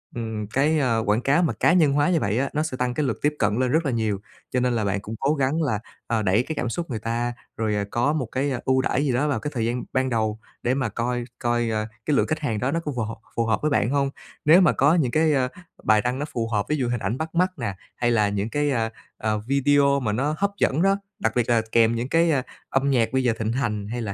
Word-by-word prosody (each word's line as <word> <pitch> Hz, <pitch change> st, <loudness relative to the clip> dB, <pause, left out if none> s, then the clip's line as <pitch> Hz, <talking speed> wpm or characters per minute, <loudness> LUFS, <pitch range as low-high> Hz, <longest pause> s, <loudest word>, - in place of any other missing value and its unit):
ừm, 110 Hz, -3 st, -4 dB
cái, 145 Hz, +8 st, +2 dB
ờ, 115 Hz, -5 st, +1 dB
quảng 105 Hz, +2 st, +2 dB
cáo 145 Hz, +7 st, +3 dB
mà 155 Hz, -8 st, +1 dB
cá 165 Hz, -, +3 dB
nhân 155 Hz, -6 st, +4 dB
hóa 145 Hz, +2 st, +3 dB
như 175 Hz, -3 st, +3 dB
vậy 105 Hz, -4 st, 0 dB
á, 140 Hz, -, 0 dB
nó 150 Hz, -, +1 dB
sẽ 155 Hz, -5 st, -4 dB
tăng 125 Hz, -1 st, 0 dB
cái 150 Hz, +4 st, 0 dB
lượt -, -, -1 dB
tiếp 150 Hz, +1 st, +1 dB
cận 105 Hz, -1 st, +2 dB
lên 130 Hz, -1 st, +1 dB
rất 160 Hz, +3 st, +2 dB
là 135 Hz, -, +1 dB
nhiều. 110 Hz, -4 st, -1 dB, 0.3 s
Cho 130 Hz, -, +1 dB
nên 125 Hz, 0 st, +1 dB
là 110 Hz, -3 st, 0 dB
bạn 100 Hz, 0 st, 0 dB
cũng 110 Hz, +3 st, -6 dB
cố 140 Hz, +3 st, +2 dB
gắng 140 Hz, +2 st, 0 dB
là, 125 Hz, -9 st, 0 dB, 0.3 s
ờ, 115 Hz, -1 st, 0 dB
đẩy 100 Hz, +5 st, +3 dB
cái 160 Hz, -, -5 dB
cảm 125 Hz, -, -2 dB
xúc 170 Hz, +6 st, -4 dB
người 115 Hz, -4 st, -3 dB
ta, 115 Hz, +2 st, -2 dB, 0.2 s
rồi, 110 Hz, -2 st, 0 dB
ờ, 100 Hz, 0 st, -1 dB
có 120 Hz, +5 st, +1 dB
một 150 Hz, -5 st, -1 dB
cái 135 Hz, +5 st, -2 dB
ưu 130 Hz, 0 st, +3 dB
đãi 135 Hz, +2 st, 0 dB
gì 135 Hz, -, +1 dB
đó 135 Hz, +5 st, +1 dB
vào 145 Hz, -, 0 dB
cái 150 Hz, -, -4 dB
thời 115 Hz, -4 st, -1 dB
gian 120 Hz, +2 st, -1 dB
ban 130 Hz, 0 st, +1 dB
đầu 110 Hz, -2 st, -1 dB, 0.2 s
để 125 Hz, -, +2 dB
mà 130 Hz, -3 st, -1 dB
coi 120 Hz, +3 st, -2 dB, 0.2 s
coi, 120 Hz, -1 st, 0 dB
ờ, 110 Hz, -1 st, -1 dB, 0.2 s
cái 150 Hz, -, +2 dB
lượng -, -, +2 dB
khách 155 Hz, -, -1 dB
hàng 115 Hz, -8 st, -2 dB
đó 130 Hz, +5 st, 0 dB
nó 165 Hz, -, 0 dB
có 155 Hz, -3 st, -4 dB
phù 120 Hz, -, -1 dB
hợp 110 Hz, +1 st, -5 dB, 0.2 s
phù 115 Hz, -, +1 dB
hợp 110 Hz, -1 st, 0 dB
với 155 Hz, -, 0 dB
bạn 120 Hz, -, +2 dB
hông. 140 Hz, 0 st, +1 dB, 0.4 s
Nếu 165 Hz, +5 st, +7 dB
mà 180 Hz, -, +5 dB
có 145 Hz, +5 st, +4 dB
những 140 Hz, -8 st, +1 dB
cái, 155 Hz, +1 st, +3 dB
ơ, 130 Hz, -2 st, +2 dB, 0.4 s
bài 110 Hz, -1 st, +4 dB
đăng 125 Hz, +4 st, -2 dB
nó 145 Hz, -, -1 dB
phù 120 Hz, -6 st, -3 dB
hợp, 105 Hz, -3 st, 0 dB
ví 150 Hz, -, +2 dB
dụ 125 Hz, -4 st, -1 dB
hình 120 Hz, -1 st, -1 dB
ảnh 110 Hz, +4 st, -2 dB
bắt 160 Hz, +2 st, -5 dB
mắt 180 Hz, +2 st, +3 dB
nè, 115 Hz, -6 st, -3 dB, 0.2 s
hay 120 Hz, 0 st, +1 dB
là 105 Hz, -3 st, +3 dB
những 100 Hz, +2 st, -2 dB
cái, 145 Hz, +3 st, 0 dB
ơ, 115 Hz, -3 st, 0 dB, 0.3 s
ờ, 110 Hz, 0 st, -1 dB
video 140 Hz, +1 st, +3 dB
mà 115 Hz, -6 st, -1 dB
nó 140 Hz, +8 st, 0 dB
hấp 200 Hz, +3 st, +1 dB
dẫn 145 Hz, -2 st, +2 dB
đó, 195 Hz, +1 st, +3 dB, 0.2 s
đặc 110 Hz, -, 0 dB
biệt 120 Hz, -2 st, +1 dB
là 115 Hz, -1 st, +4 dB
kèm 115 Hz, 0 st, +4 dB
những 120 Hz, +3 st, -3 dB
cái, 165 Hz, +1 st, +3 dB
ơ, 140 Hz, -4 st, +2 dB, 0.3 s
âm 135 Hz, +1 st, +1 dB
nhạc 120 Hz, -2 st, +2 dB
bây 130 Hz, 0 st, +2 dB
giờ 120 Hz, -2 st, +2 dB
thịnh 110 Hz, 0 st, -1 dB
hành, 110 Hz, -5 st, -2 dB
hay 120 Hz, +3 st, -4 dB
là 105 Hz, -3 st, -3 dB
125 Hz, 290 wpm, -24 LUFS, 115-145 Hz, 0.4 s, Nếu